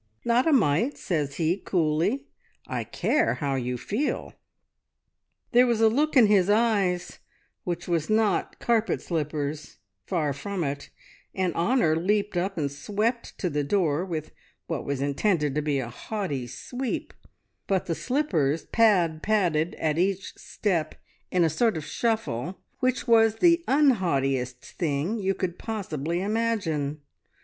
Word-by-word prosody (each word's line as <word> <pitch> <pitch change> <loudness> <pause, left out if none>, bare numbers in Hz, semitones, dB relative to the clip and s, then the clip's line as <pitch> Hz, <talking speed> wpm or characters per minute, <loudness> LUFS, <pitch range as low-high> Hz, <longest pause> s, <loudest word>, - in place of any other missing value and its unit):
"`Not 240 +4 +3
a - - +4
mite,' 230 - +2
says 150 -6 -2
he 170 +2 +1
coolly. 180 - 0 0.4
`I - - -4
care - - +1
how 140 -2 -2
you 125 -1 -2
feel!' 210 - -2 1.2
"There 250 +1 +6
was 235 -2 +1
a 225 0 +6
look 295 +5 +1
in 240 - +8
his 205 -2 +4
eyes 200 -5 +1 0.5
which 175 -1 -3
was 165 -3 0
not 215 -3 +1
carpet 230 -2 +1
slippers, 150 - -3 0.3
far 150 -5 0
from 190 +5 -4
it, 140 -1 -4 0.5
and 185 -3 0
Honor 170 -3 +2
leaped 200 +4 0
up 185 +2 -1
and 145 -3 -1
swept 215 - -2
to 185 - -1
the 150 -3 -1
door 165 0 +1
with 160 -4 -4 0.3
what - - -4
was 140 -1 -2
intended 150 +1 +1
to 150 - 0
be 145 -2 0
a 125 -3 -3
haughty 145 - -4
`sweep,' 245 - -4 0.6
but 190 -2 +1
the 170 - -1
slippers 165 - 0
pad 180 -9 +3
padded 175 -6 +1
at 155 0 -1
each 195 +1 0
step 170 -7 -2 0.3
in 180 -1 +2
a - - +4
sort 210 +5 +1
of 155 - -5
shuffle, 190 - -2 0.2
which 255 +1 0
was 225 -2 +5
the 335 +5 +4
unhaughtiest 140 - +1
thing 165 +7 0
you 195 -1 0
could 180 -2 -3
possibly 175 -6 -3
imagine. 195 -10 -1
180 Hz, 145 wpm, -26 LUFS, 150-220 Hz, 1.2 s, in